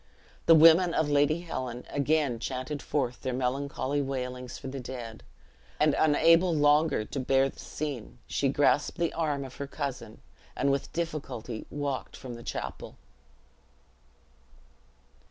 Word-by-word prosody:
The 165 - +9
women 165 +2 +7
of 150 -2 +1
Lady 145 +3 +3
Helen 130 -8 -5
again 145 -3 +1
chanted 130 +4 -4
forth 125 -4 -2
their 130 -1 -2
melancholy 135 +2 -1
wailings 125 -2 -4
for - - -8
the 135 +1 -5
dead; 120 -3 -7 0.6
and 150 -1 +4
unable 165 +3 +4
longer 150 -4 +3
to 135 - -5
bear 135 +1 +3
the - - -15
scene, 140 -7 -5
she 140 - 0
grasped 145 +3 +2
the 170 -2 0
arm 150 -4 -1
of 130 - -11
her 140 - -4
cousin, 130 -5 -5 0.4
and 140 - +1
with 140 0 -2
difficulty 135 -9 -4
walked 140 -2 -4
from 125 -2 -8
the 120 - -9
chapel. - - -6
140 Hz, 135 wpm, -29 LUFS, 130-155 Hz, 0.6 s, The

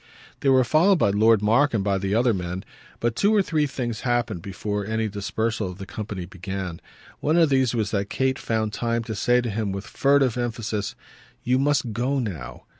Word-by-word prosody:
They 140 - +1
were 130 -1 +5
followed 170 +9 +4
by 100 - +3
Lord 110 +1 +4
Mark 120 +5 +3
and 100 - 0
by 100 -1 +1
the 100 +1 -1
other 120 0 +3
men, 90 -1 -4 0.3
but 120 -1 0
two 205 - +3
or 205 - +4
three 155 -4 +1
things 120 -5 -4
happened 120 -8 -1
before 100 +3 -3
any 110 +2 -1
dispersal 105 +1 -2
of 90 - -9
the 95 - -7
company 100 -2 -6
began. 95 -1 -6 0.4
One 155 +3 +1
of 165 -3 +5
these 130 -3 +2
was 110 -3 -1
that 100 -1 -1
Kate 130 0 0
found 110 -2 -1
time 115 0 -1
to 110 - -5
say 120 +4 +2
to 120 - -3
him 105 -1 -2
with 95 +1 -5
furtive 135 -3 +2
emphasis: 110 -4 -3 0.5
"You 125 +1 +2
must 140 -5 +1
go 125 +5 0
now!" 95 - -5
115 Hz, 200 wpm, -24 LUFS, 100-130 Hz, 0.5 s, were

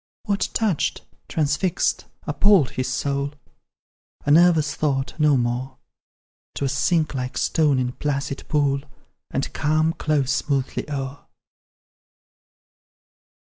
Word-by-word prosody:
What 200 -3 0
touched, 210 -9 0 0.2
transfixed, 155 +3 0 0.2
appalled, 165 -1 +4
his 130 +1 -2
soul? 140 +3 -1 0.9
A 145 - +2
nervous 160 -2 +5
thought, 135 -3 -1
no 150 -2 +4
more; 125 +2 -2 0.8
'Twill 140 - -1
sink 160 +1 +1
like 125 -1 -4
stone 150 -4 +2
in 125 -1 0
placid 140 0 -3
pool, 140 -2 +1 0.5
And 135 - -3
calm 155 +2 +1
close 145 -5 0
smoothly 140 0 -1
o'er. 140 -1 -5
145 Hz, 105 wpm, -23 LUFS, 135-155 Hz, 0.9 s, nervous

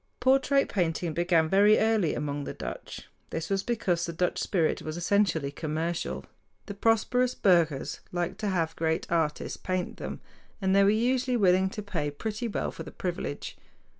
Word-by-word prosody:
Portrait 270 +2 +3
painting 170 -3 -1
began 170 -1 +2
very 205 +4 +5
early 220 -8 +2
among 145 -1 -3
the - - -6
Dutch. - - -7 0.2
This 165 +3 -4
was 195 0 +2
because 195 -7 0
the 170 - -2
Dutch 175 +2 -1
spirit 170 -5 +1
was 155 +1 -5
essentially 175 -5 +1
commercial. 155 - -3 0.4
The - - -6
prosperous 230 +4 +2
burghers 170 -7 +2
liked 175 -1 -2
to 210 - -1
have 165 -4 0
great 160 0 0
artists 160 -3 0
paint 185 -1 -3
them, - - -6 0.4
and 190 -1 +2
they 200 - +6
were 195 - +5
usually 245 +3 +2
willing 190 -2 +4
to 210 +2 -6
pay 170 -7 -2
pretty 215 +10 -4
well 215 - -2
for - - -9
the - - -7
privilege. 175 -5 -4
180 Hz, 165 wpm, -28 LUFS, 160-210 Hz, 0.4 s, they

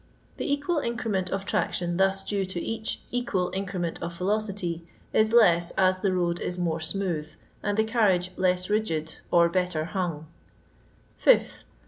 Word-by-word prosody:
The - - -2
equal 290 +3 +1
increment 225 -7 -1
of 195 0 -3
traction 175 -3 -1
thus 195 0 +2
due 200 -2 -1
to 185 -2 -4
each 225 +4 -3
equal 210 -7 -1
increment 185 -3 -3
of 170 0 -5
velocity 190 -3 -1 0.3
is 220 0 +3
less 175 -7 +5
as 185 -1 +3
the 195 0 +1
road 175 -1 0
is 180 - -3
more 165 -2 -1
smooth, 160 -2 -2 0.3
and 205 0 -1
the 220 - +4
carriage 205 -6 +2
less 185 -1 +1
rigid 165 -7 -1
or 170 -1 +5
better 170 -2 -1 1.4
5th. - - +4
185 Hz, 145 wpm, -27 LUFS, 175-210 Hz, 1.4 s, less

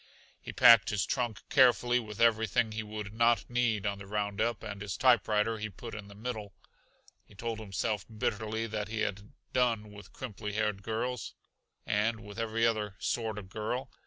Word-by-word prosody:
He - - -7
packed 115 -3 +7
his 105 -2 0
trunk 120 -4 -2
carefully 125 -2 +5
with 105 -3 -8
everything 115 0 +3
he 110 0 -3
would 105 -1 -6
not 115 +1 +3
need 120 -4 +1
on 100 -1 -1
the 100 - -9
roundup, 105 +2 -1
and 100 -1 -6
his 100 -2 -4
typewriter 115 -3 +3
he 110 0 -3
put 115 +4 -9
in 105 -2 -7
the 100 - -13
middle. 110 -3 -5 0.7
He 105 - -19
told 115 +1 -4
himself 100 -1 -2
bitterly 110 0 -2
that 105 -2 -3
he 110 0 -3
had 100 +1 -3 0.2
done 115 -4 +1
with 105 -2 -12
crimply 105 -4 -6
haired 105 -2 0
girls, 115 +3 -3 0.5
and 110 +2 +1
with 105 +1 -9
every 115 0 +1
other 105 -4 0
sort 110 -1 -2
of 95 -3 -8
girl. 120 +6 -3
110 Hz, 175 wpm, -31 LUFS, 105-115 Hz, 0.7 s, packed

